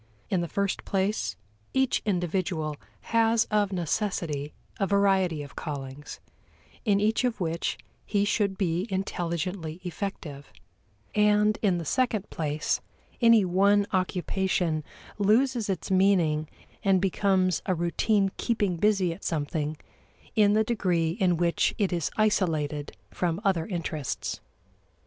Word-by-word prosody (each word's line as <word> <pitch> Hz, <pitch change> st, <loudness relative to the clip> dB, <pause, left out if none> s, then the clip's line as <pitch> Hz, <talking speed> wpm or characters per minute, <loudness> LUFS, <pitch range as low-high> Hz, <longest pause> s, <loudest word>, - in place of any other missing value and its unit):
In 185 Hz, -3 st, +2 dB
the 170 Hz, -, -2 dB
first 200 Hz, +2 st, -1 dB
place, 195 Hz, +2 st, -1 dB, 0.4 s
each 265 Hz, -1 st, +2 dB
individual 175 Hz, -4 st, -1 dB, 0.4 s
has 225 Hz, 0 st, +4 dB
of 205 Hz, -2 st, +2 dB
necessity 170 Hz, -5 st, -2 dB, 0.3 s
a 195 Hz, -, +1 dB
variety 190 Hz, -6 st, +2 dB
of 140 Hz, -, -12 dB
callings, 140 Hz, -1 st, -6 dB, 0.6 s
in 205 Hz, -4 st, +3 dB
each 215 Hz, +4 st, +2 dB
of 245 Hz, -3 st, 0 dB
which 170 Hz, -2 st, -1 dB, 0.3 s
he 205 Hz, -1 st, +1 dB
should 205 Hz, -2 st, 0 dB
be 180 Hz, +1 st, 0 dB
intelligently 175 Hz, -3 st, -3 dB
effective; 160 Hz, -6 st, -6 dB, 0.6 s
and 210 Hz, 0 st, +3 dB
in 190 Hz, -5 st, +2 dB
the 170 Hz, -, -4 dB
second 230 Hz, -, 0 dB
place 150 Hz, -1 st, -1 dB, 0.4 s
any 230 Hz, -4 st, +6 dB
one 200 Hz, +3 st, +3 dB
occupation 185 Hz, -3 st, 0 dB, 0.4 s
loses 230 Hz, +2 st, +2 dB
its 190 Hz, 0 st, -3 dB
meaning 175 Hz, -6 st, +3 dB, 0.3 s
and 195 Hz, -2 st, +4 dB
becomes 190 Hz, -1 st, +1 dB
a 185 Hz, -, +2 dB
routine 195 Hz, +4 st, +1 dB
keeping 205 Hz, -7 st, 0 dB
busy 195 Hz, -2 st, +2 dB
at 170 Hz, -, -14 dB
something 150 Hz, -1 st, -2 dB, 0.6 s
in 205 Hz, -2 st, +5 dB
the 220 Hz, +1 st, +4 dB
degree 180 Hz, -8 st, 0 dB
in 180 Hz, -2 st, +1 dB
which 170 Hz, 0 st, +1 dB
it 200 Hz, -4 st, +1 dB
is 170 Hz, -3 st, 0 dB
isolated 160 Hz, -9 st, +1 dB, 0.2 s
from 170 Hz, -1 st, -1 dB
other 180 Hz, -6 st, +1 dB
interests. 165 Hz, -, -3 dB
190 Hz, 125 wpm, -27 LUFS, 165-205 Hz, 0.6 s, any